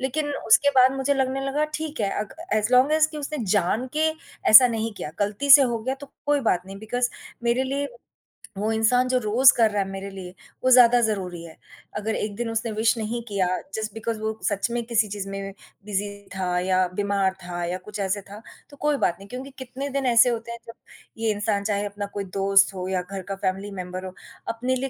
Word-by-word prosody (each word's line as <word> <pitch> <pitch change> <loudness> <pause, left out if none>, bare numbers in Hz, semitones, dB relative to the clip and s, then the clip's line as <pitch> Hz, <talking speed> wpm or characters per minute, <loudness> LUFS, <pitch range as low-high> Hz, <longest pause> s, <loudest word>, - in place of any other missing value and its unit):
लेकिन 290 +3 -2
उसके 285 +5 +5
बाद 255 +1 +6
मुझे 270 +1 +1
लगने 265 0 0
लगा 290 +3 0
ठीक 310 -3 -4
है, 200 - +1
अग 210 -1 -4 0.2
एज़ 215 +3 0
लॉन्ग 255 +4 +5
एज़ 310 0 +4
कि 310 - -8
उसने 295 +1 -4 0.2
जान 205 +6 +1
के 315 +1 +3 0.4
ऐसा 250 +4 +11
नहीं 225 -1 -2
किया, 150 - -6
गलती 205 +7 -1
से 275 0 +11
हो 240 -3 0
गया 255 +4 -3
तो 285 +1 -11 0.2
कोई 290 -1 +2
बात 180 -3 +2
नहीं 195 0 -9
बिकॉज़ 245 +4 -1 0.3
मेरे 235 +2 +1
लिए 280 +2 -2 0.7
वो 210 +3 -1
इंसान 225 +3 +2
जो 255 - +2
रोज़ 245 +4 +6
कर 225 -2 +4
रहा 205 -1 0
है 195 - -3
मेरे 195 0 -6
लिए, 185 -2 -9 0.3
वो 255 - +3
ज़्यादा 245 -1 +7
ज़रूरी 190 -6 -2
है, 165 -1 -12 0.4
अगर 220 +1 -2
एक 210 -1 -3
दिन 235 +2 -3
उसने 225 0 -2
विश 220 +2 +1
नहीं 225 +2 -3
किया 200 -4 0 0.3
जस्ट 215 -1 -4
बिकॉज़ 225 0 -4
वो 220 0 -3
सच 205 +2 0
में 240 0 -1
किसी 225 -2 +1
चीज़ 200 -1 -5
में 195 0 -6 0.3
बिज़ी 205 0 -2 0.3
था 180 -2 -1
या 185 0 +1
बीमार 200 -1 0
था 175 0 -5
या 175 +1 -2
कुछ 210 0 -7
ऐसे 200 +1 -1
था, 205 +2 -12 0.3
तो 285 - -15
कोई 295 0 +1
बात 175 - +1
नहीं 195 - -12
क्योंकि 255 +4 -7
कितने 260 +2 -6
दिन 275 - -1
ऐसे 235 +2 +6
होते 235 -1 -4
हैं 235 - -6
जब 230 - -8 0.4
ये 225 -1 0
इंसान 205 -1 -1
चाहे 205 0 -1
अपना 205 0 -5
कोई 200 - -3 0.2
दोस्त 195 0 +4
हो 185 -1 -5
या 185 -1 -1
घर 190 +2 -7
का - - -1
फ़ैमिली 195 +1 -3
मेंबर 180 +1 -7
हो, 185 - -7 0.3
अपने 250 +3 -1
लिए 265 +1 -3
220 Hz, 225 wpm, -24 LUFS, 195-255 Hz, 0.7 s, ऐसा